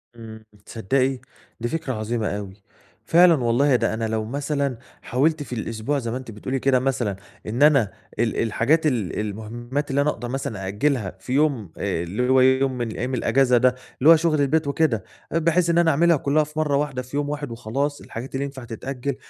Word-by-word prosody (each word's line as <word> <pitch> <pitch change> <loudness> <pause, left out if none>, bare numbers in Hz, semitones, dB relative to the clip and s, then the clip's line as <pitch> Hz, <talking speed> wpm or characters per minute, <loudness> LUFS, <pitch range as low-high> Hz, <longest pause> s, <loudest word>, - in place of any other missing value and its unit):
إمم، 110 -1 -11 0.2
تصدّقي 130 +4 0 0.4
دي 120 - -2
فكرة 135 -2 -3
عظيمة 110 0 -2
أوي! 100 -1 -6 0.4
فعلًا 175 +1 +6
والله 125 +4 +3
ده 120 - +1
أنا 110 0 -2
لو 110 0 -2
مثلًا 140 +1 -2 0.2
حاولت 145 +5 +1
في 125 - -8
الأسبوع 115 +6 -2
زي 115 -2 -4
ما 125 - -2
أنتِ 130 -3 -9
بتقولي 130 +5 -3
كده 130 -1 +3
مثلًا، 125 -6 -1 0.3
إن 120 +6 +1
أنا 135 -10 +5 0.3
ال 115 -1 +1
الحاجات 140 +9 +1
ال 115 -10 -1
المهمات 120 +7 -4
اللي 140 +1 +2
أنا 150 - +2
أقدر 120 - -4
مثلًا 125 -7 -4
أأجلها 105 -1 -1
في 125 +6 -5
يوم 135 - +1
آآ، 85 - -2
اللي 105 +9 -2
هو 130 0 +5
يوم 130 0 +3
من 120 -2 -2
أيام 125 +2 -3
الأجازة 130 0 +3
ده، 125 +1 +3 0.2
اللي 150 +5 +5
هو 165 - +10
شغل 160 -2 +1
البيت 150 +2 +1
وكده، 140 -8 +1 0.3
بحيث 170 +1 +2
إن 170 - +2
أنا 170 -1 +4
أعملها 170 +2 +4
كلّها 145 +3 +2
في 150 +1 -6
مَرّة 150 -2 +1
واحدة، 140 -3 -2
في 130 +3 -6
يوم 145 0 -1
واحد 145 -3 -4
وخلاص، 135 +6 -3
الحاجات 120 +4 -8
اللي 140 +1 -1
ينفع 135 -2 -8
تتأجل 125 +3 -4
130 Hz, 195 wpm, -23 LUFS, 115-145 Hz, 0.4 s, هو